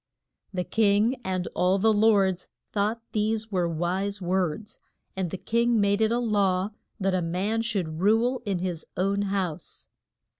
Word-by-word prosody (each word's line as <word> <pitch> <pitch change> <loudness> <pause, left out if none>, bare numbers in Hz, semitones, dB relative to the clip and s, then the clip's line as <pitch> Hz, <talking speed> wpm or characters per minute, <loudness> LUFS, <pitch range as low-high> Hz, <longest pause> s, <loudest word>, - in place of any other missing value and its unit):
The 180 -2 -2
king 215 +5 +2
and 185 -1 -2
all 185 +2 +2
the 220 +3 +3
lords 200 -4 +3 0.2
thought 215 +3 -1
these 220 +1 -1
were 180 -3 +1
wise 185 +5 -1
words. 185 +2 -2 0.4
And 190 -2 -2
the 190 - -5
king 235 +3 +1
made 200 +1 +2
it 220 0 +3
a 235 - +2
law 200 -4 +1 0.3
that 195 -1 +1
a 185 - +1
man 190 +7 -1
should 185 -9 -2
rule 230 +6 +2
in 200 -4 -1
his 175 -2 -3
own 195 +2 +1
house. 190 -5 -3
200 Hz, 155 wpm, -26 LUFS, 185-220 Hz, 0.4 s, the